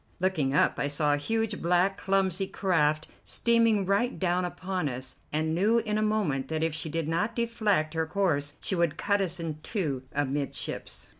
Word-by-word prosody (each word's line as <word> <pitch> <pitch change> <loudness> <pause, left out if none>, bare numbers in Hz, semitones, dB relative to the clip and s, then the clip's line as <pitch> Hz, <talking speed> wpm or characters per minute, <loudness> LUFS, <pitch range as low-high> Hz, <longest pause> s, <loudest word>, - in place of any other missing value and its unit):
Looking 155 -7 +1
up, - - +3
I 140 - +1
saw 145 +1 +1
a - - +2
huge, 225 +6 -1
black, 180 +3 +2
clumsy 195 -1 +1
craft 155 -6 +1 0.2
steaming 230 -4 +3
right 200 +6 +1
down 180 -1 +1
upon 180 -2 -3
us, 130 0 -5
and 155 +1 0
knew 205 +7 +3
in 215 -2 0
a - - 0
moment 210 -11 0
that 160 0 -2
if 165 -1 0
she 160 +1 -3
did 165 0 -2
not 195 +8 0
deflect 215 -9 +1
her 160 -1 -1
course 155 -6 0
she - - 0
would 170 -3 +1
cut 200 +2 +1
us 180 -2 -2
in 160 -2 -4
two 155 - -2
amidships. 140 0 -3
175 Hz, 180 wpm, -28 LUFS, 155-200 Hz, 0.2 s, up